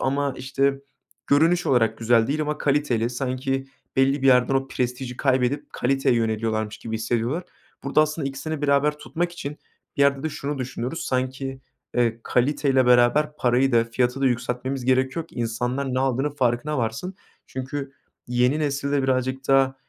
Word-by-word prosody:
ama, 140 0 0
işte, 135 +1 0 0.5
görünüş 165 +5 +3
olarak 115 -4 +2
güzel 115 0 +3
değil 150 +2 -1
ama 150 0 -2
kaliteli, 135 -5 +1
sanki 135 +1 -2 0.3
belli 135 +1 +3
bir - - +3
yerden 125 0 +5
o 135 0 0
prestiji 125 0 -3
kaybedip 135 +2 0
kaliteye 135 0 +1
yöneliyorlarmış 110 -1 -1
gibi 110 - -6
hissediyorlar. 120 +8 -1 0.4
Burada 140 +2 +3
aslında 155 -2 0
ikisini 145 +2 -5
beraber 145 +1 +2
tutmak 175 +3 -3
için 150 -3 -6 0.4
bir 140 - +3
yerde 140 -1 +3
de 160 - -1
şunu 140 -1 -4
düşünüyoruz, 130 +5 -4
sanki, 130 +1 -2 0.3
eee, 115 -2 +1
kaliteyle 135 +1 +2
beraber 125 +5 +4
parayı 125 +2 +2
da 115 -1 +4
fiyatı 125 +3 -1
da 135 - +3
yükseltmemiz 125 +2 -2
gerekiyor 130 +5 +1
ki - - -20
insanlar 125 +3 -2
ne 130 - +1
aldığının 135 +2 0
farkına 130 +2 0
varsın. 115 +12 -3 0.3
Çünkü 135 +1 -5 0.3
yeni 125 +4 +2
nesilde 140 -1 0
birazcık 130 0 -1
daha 135 -1 +4
135 Hz, 155 wpm, -24 LUFS, 125-140 Hz, 0.5 s, yerden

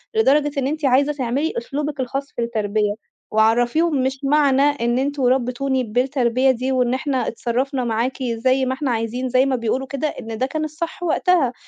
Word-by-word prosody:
لدرجة 295 -8 +3
إن 265 - 0
أنتِ 305 0 -2
عايزة 275 +3 +3
تعملي 275 - -1
أسلوبِك 295 - -4
الخاص 275 +2 -3
في 240 - -2
التربية. 215 -2 0 0.4
وعرّفيهم 245 +7 +2
مش 265 0 -1
معنى 275 -1 +3
إن 255 -4 +1
أنتم 280 0 -1
ربّيتوني 255 +1 +1
بالتربية 255 +2 +1
دي 255 +2 -2
وإن 250 -1 +1
"إحنا 265 -1 -1
اتصرّفنا 255 +3 -2
معاكِ 240 +3 -1
زي 255 +3 +1
ما 260 - 0
إحنا 265 -1 -2
عايزين." 235 +3 -2
زي 255 +2 +3
ما 270 - +1
بيقولوا 250 +3 -2
كده 280 +3 -2
إن 225 -6 -6
ده 260 - +1
كان 310 +3 -3
الصح 330 +3 -5
وقتها، 325 -5 +2
260 Hz, 175 wpm, -21 LUFS, 240-285 Hz, 0.4 s, لدرجة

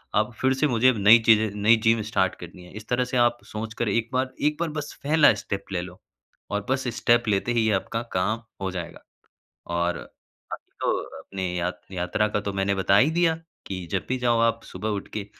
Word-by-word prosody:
अब 110 +3 +1
फिर 130 0 +3
से 150 +3 +2
मुझे 125 -1 +4
अब 125 - +1
नई 105 +3 +7
चीज़ें 110 -1 +5
नई 110 +3 +6
जिम 115 0 +3
स्टार्ट 95 -1 +1
करनी 90 +1 -11
है। 90 - -15
इस 110 - -10
तरह 125 +1 +1
से 130 0 -2
आप 120 0 +3
सोच 110 +1 -6
कर 120 - -1
1 115 +3 0
बार 130 0 0
1 150 +1 +1
बार 170 - 0
बस 145 - -7
पहला 150 +1 +5
स्टेप 100 -1 -4
ले 90 - 0
लो 90 +1 -10 0.5
और 105 0 -2
बस 130 -1 0
स्टेप 120 0 +3
लेते 105 +3 +1
ही 115 -2 +2
आपका 105 +3 -1
काम 105 +5 0 0.2
हो 95 - -1
जाएगा 85 -2 -7 0.7
और 85 0 0
अभी - - -13
तो - - +2 0.3
अपनी 95 -2 -4
यात 90 +1 -3
यात्रा 95 +3 0
का 105 - -1
तो 100 -1 -4
मैंने 100 0 0
बता 95 +1 +3
ही 130 +8 +5
दिया, 165 -1 +2 0.3
कि 95 -2 -5
जब - - -1
भी 130 - 0
जाओ 120 -2 +2
आप 115 0 +2
सुबह 110 - -5
उठ - - -15
के 105 -2 -3
110 Hz, 220 wpm, -25 LUFS, 95-125 Hz, 0.7 s, नई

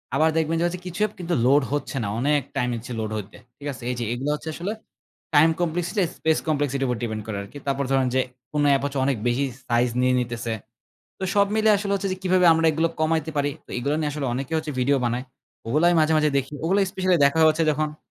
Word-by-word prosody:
আবার 160 +1 +4
দেখবেন 160 +1 +1
যে - - +2 0.2
কিছু 180 +2 -6
অ্যাপ 215 - 0
কিন্তু 175 -1 -2
লোড 140 +3 +5
হচ্ছে 145 -1 -2
না। - - -2
অনেক 145 +3 +2
টাইম 125 - +1
নিচ্ছে 115 +2 -8
লোড 110 -1 -3
হইতে। 105 0 -8 0.2
ঠিক 145 - -8
আছে? 120 - -11
এইযে 120 -1 -3
এগুলা 135 +5 -2
হচ্ছে 155 +1 -7
আসলে 190 +7 -3 0.6
টাইম 155 +3 +7
কমপ্লেক্সিটি 175 +4 -1 0.2
স্পেস 160 0 +2
কমপ্লেক্সিটি 145 -3 0
উপর 125 - -1
ডিপেন্ড 110 -2 -3
করে 105 -2 -3
আরকি। 100 +9 -11
তারপর 140 0 0
ধরুন 135 -1 +3
যে 130 - +4 0.3
কোনো 145 -1 +2
অ্যাপ 135 -1 +3
হচ্ছে 140 -1 -2
অনেক 135 -4 +1
বেশি 130 +4 +1 0.2
সাইজ 120 +1 +2
নিয়ে 125 0 +3
নিতেছে। 120 -1 -3 0.7
তো 190 - -3
সব 200 0 +4
মিলিয়ে 215 -1 +4
আসলে 200 -1 -2
হচ্ছে 195 0 -1
যে - - -3
কিভাবে 185 -1 +3
আমরা 165 0 +2
এগুলো 160 +2 +1
কমাইতে 160 0 +1
পারি। 145 0 +1 0.2
তো - - -16
এগুলা 140 +5 0
নিয়ে 150 -1 -1
আসলে 145 -2 -3
অনেকে 135 +4 -4 0.3
ভিডিও 140 +2 +3
বানায়। 120 +2 -1 0.4
ওগুলাই 155 +9 +3
আমি 165 - +3
মাঝে, 155 +1 +3
মাঝে, 150 0 +3
দেখি। 135 +2 -4
ওগুলো 190 +4 +2
স্পেশাল 185 -1 +1
দেখা 160 +3 +1
হচ্ছে 160 +1 0
যখন 150 0 -2
145 Hz, 220 wpm, -24 LUFS, 130-165 Hz, 0.7 s, টাইম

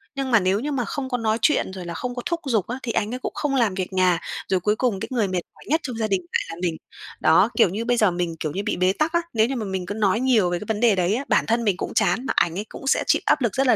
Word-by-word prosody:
nhưng 270 -2 -2
mà 230 - +6
nếu 190 +2 +1
như 295 +4 -3
mà 250 -4 -1
không 265 -2 -4
có 245 - 0
nói 220 -1 0
chuyện 300 - +2
rồi 185 -2 -7
là 170 - -5
không 245 +7 -4
có 245 - -4
thúc 340 -1 -1
giục 220 -8 0
á, 250 +3 -4
thì 235 - -2
anh 215 +3 -1
ấy 255 - -4
cũng - - -4
không 285 -2 -1
làm 230 -7 +2
việc 185 0 -4
nhà. 180 -2 +3 0.3
Rồi 190 -1 +1
cuối 210 +4 +1
cùng 225 -5 0
cái - - -4
người 225 -6 +1
mệt 185 -1 -1
mỏi - - -17
nhất 315 +3 +2
trong 250 -4 -5
gia 220 -1 0
đình 195 -3 0
lại - - +1
là 165 - -5
mình. 165 -3 -1 0.4
Đó, 165 +7 +5
kiểu 225 - +5
như 220 +5 -3
bây 245 0 +1
giờ 215 -5 +4
mình, 175 -2 -2
kiểu 155 - -2
như, 195 +5 -3
bị - - -1
bế 185 +1 +3
tắc 310 +6 -1
á. 340 - +3
Nếu 220 0 +3
như 270 - -3
mà 225 - -3
mình 190 -2 -3
cứ 205 - -4
nói 210 0 +1
nhiều 240 -8 +3
về 175 0 -1
cái - - -8
vấn 220 -2 -1
đề 230 -3 +4
đấy 185 +2 +1
á, 275 +4 -3
bản - - +2
thân 235 +1 +1
mình 200 -4 +1
cũng - - -4
chán 255 - +1
mà - - -1
ảnh 170 +2 +2
ấy 210 - -4
cũng 270 - -9
sẽ - - +3
chịu - - +3
áp - - +3
lực 235 -4 0
rất 270 0 +2
là - - +5
220 Hz, 340 wpm, -23 LUFS, 185-250 Hz, 0.4 s, mà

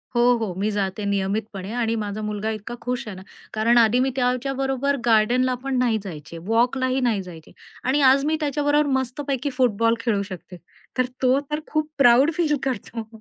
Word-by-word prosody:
हो, 240 - +3 0.2
हो. 205 -5 -2
मी 205 +3 0
जाते 205 0 -2
नियमितपणे 200 0 -2
आणि 230 0 0
माझा 205 +1 -4
मुलगा 210 +1 -3
इतका 215 +3 -8
खुश 250 0 -3
आहे 205 - -6
ना, 185 - -10 0.3
कारण 225 +2 +3
आधी 235 +1 +5
मी 265 - +2
त्याच्याबरोबर 270 +2 0
गार्डनला 240 +3 +3
पण 270 -1 -1
नाही 245 -3 +2
जायचे 165 -3 -8
वॉकलाही 255 +3 +1
नाही 215 -4 0
जायचे 165 -3 -12 0.3
आणि 270 +3 +1
आज 275 +1 +2
मी 315 +1 +1
त्याच्याबरोबर 295 0 +1
मस्तपैकी 270 +2 -3
फुटबॉल 230 -2 +2
खेळू 230 -4 0
शकते, 185 -1 -9 0.4
तर 255 - +3 0.2
तो 260 +1 +4
तर 300 - 0
खूप 310 0 -1
प्राउड 260 +3 +6
फील 310 -4 +2
करतो. 235 -3 -4
240 Hz, 175 wpm, -23 LUFS, 210-270 Hz, 0.4 s, प्राउड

